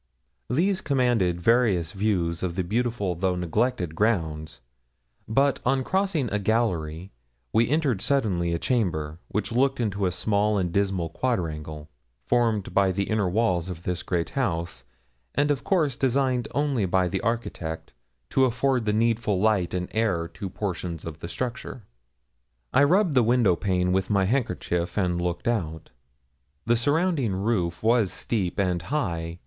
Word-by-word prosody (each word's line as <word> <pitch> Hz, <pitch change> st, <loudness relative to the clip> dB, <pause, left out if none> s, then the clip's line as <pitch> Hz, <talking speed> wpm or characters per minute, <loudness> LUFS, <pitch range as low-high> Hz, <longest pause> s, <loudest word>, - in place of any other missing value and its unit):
These 185 Hz, +9 st, +1 dB
commanded 120 Hz, -, +1 dB
various 100 Hz, -5 st, +2 dB
views 90 Hz, -5 st, 0 dB
of 90 Hz, -2 st, -2 dB
the 95 Hz, -, 0 dB
beautiful 110 Hz, -1 st, -1 dB
though 90 Hz, +1 st, 0 dB
neglected 90 Hz, +1 st, -1 dB
grounds; 80 Hz, -6 st, -1 dB, 0.7 s
but 135 Hz, +4 st, +2 dB
on 130 Hz, +1 st, +1 dB
crossing 190 Hz, -5 st, 0 dB
a 105 Hz, -, +1 dB
gallery 95 Hz, -6 st, -1 dB, 0.4 s
we 115 Hz, +1 st, +3 dB
entered 140 Hz, -, +1 dB
suddenly 100 Hz, -12 st, +1 dB
a 85 Hz, -, 0 dB
chamber, 85 Hz, -, -1 dB
which 105 Hz, +3 st, -2 dB
looked 135 Hz, +3 st, +2 dB
into 100 Hz, -4 st, 0 dB
a -, -, 0 dB
small 105 Hz, +3 st, +1 dB
and 90 Hz, -3 st, 0 dB
dismal 95 Hz, -4 st, 0 dB
quadrangle, 80 Hz, -8 st, -3 dB, 0.4 s
formed 115 Hz, -5 st, +1 dB
by 100 Hz, -1 st, +3 dB
the 100 Hz, +3 st, -2 dB
inner 105 Hz, -4 st, +1 dB
walls 95 Hz, -4 st, +1 dB
of 90 Hz, -1 st, -7 dB
this 90 Hz, 0 st, -2 dB
great 85 Hz, -2 st, -2 dB
house, 85 Hz, -, -2 dB, 0.5 s
and 145 Hz, +1 st, +2 dB
of 140 Hz, -, -1 dB
course 155 Hz, -9 st, +1 dB
designed 130 Hz, -1 st, +1 dB
only 140 Hz, -8 st, +1 dB
by 90 Hz, 0 st, +2 dB
the 95 Hz, +2 st, -2 dB
architect 90 Hz, -, -3 dB, 0.4 s
to 135 Hz, -, +4 dB
afford 125 Hz, 0 st, +1 dB
the 105 Hz, -, +1 dB
needful 110 Hz, -3 st, +1 dB
light 100 Hz, -4 st, +2 dB
and 90 Hz, 0 st, -2 dB
air 95 Hz, -7 st, 0 dB
to 95 Hz, -, -6 dB
portions 90 Hz, -4 st, -4 dB
of 80 Hz, -1 st, -7 dB
the 85 Hz, -, -7 dB
structure. 125 Hz, +1 st, -5 dB, 0.9 s
I 140 Hz, -, +5 dB
rubbed 180 Hz, +2 st, +3 dB
the 130 Hz, -, +5 dB
window 115 Hz, -5 st, +3 dB
pane 90 Hz, -1 st, 0 dB
with 95 Hz, 0 st, 0 dB
my 100 Hz, -2 st, +2 dB
handkerchief 90 Hz, -7 st, -1 dB
and 90 Hz, -3 st, +1 dB
looked 90 Hz, +6 st, -2 dB
out. 80 Hz, -9 st, -2 dB, 0.7 s
The 120 Hz, -, +3 dB
surrounding 145 Hz, -, +1 dB
roof 95 Hz, -4 st, -1 dB
was 115 Hz, -3 st, +3 dB
steep 100 Hz, -5 st, -2 dB
and 90 Hz, -3 st, +1 dB
high. 85 Hz, -, -2 dB
100 Hz, 155 wpm, -25 LUFS, 90-125 Hz, 0.9 s, I